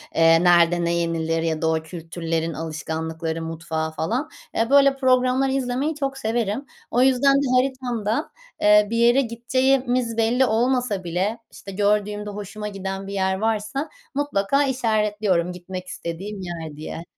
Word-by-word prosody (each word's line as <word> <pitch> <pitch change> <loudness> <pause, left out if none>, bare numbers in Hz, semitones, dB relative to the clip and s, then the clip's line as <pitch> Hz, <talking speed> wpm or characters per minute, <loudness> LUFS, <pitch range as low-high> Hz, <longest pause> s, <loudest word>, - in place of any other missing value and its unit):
eee, 165 +1 +5
nerede 175 -1 +5
ne 170 - +1
yenilir 165 -1 0
ya 160 -1 -1
da 160 - +1
o 160 0 -1
kültürlerin 165 0 -3
alışkanlıkları 160 +1 -4
mutfağı 160 -1 -3
falan. 235 - -2 0.3
Eee, 225 +1 +1
böyle 275 0 +6
programlar 255 0 +3
izlemeyi 270 +3 -1
çok 275 -2 -3
severim. 230 0 -1 0.3
O 245 - +3
yüzden 265 +1 +4
de 280 - +2
haritamda, 250 -1 -1 0.3
eee, 210 0 +6
bir 230 - -1
yere 240 +3 +5
gideceğimiz 250 0 0
belli 235 +3 +3
olmasa 240 -3 +1
bile, 185 +6 -1
işte 195 - -10
gördüğümde 210 +1 0
hoşuma 210 +1 -6
giden 195 -1 -5
bir 200 - -6
yer 190 -1 +1
varsa 220 +7 -1 0.3
mutlaka 280 -1 +1
işaretliyorum 210 -8 0
gitmek 180 +1 -7
istediğim 190 +4 -6
yer 165 -4 -6
diye. 160 +1 -6
210 Hz, 145 wpm, -23 LUFS, 170-250 Hz, 0.3 s, böyle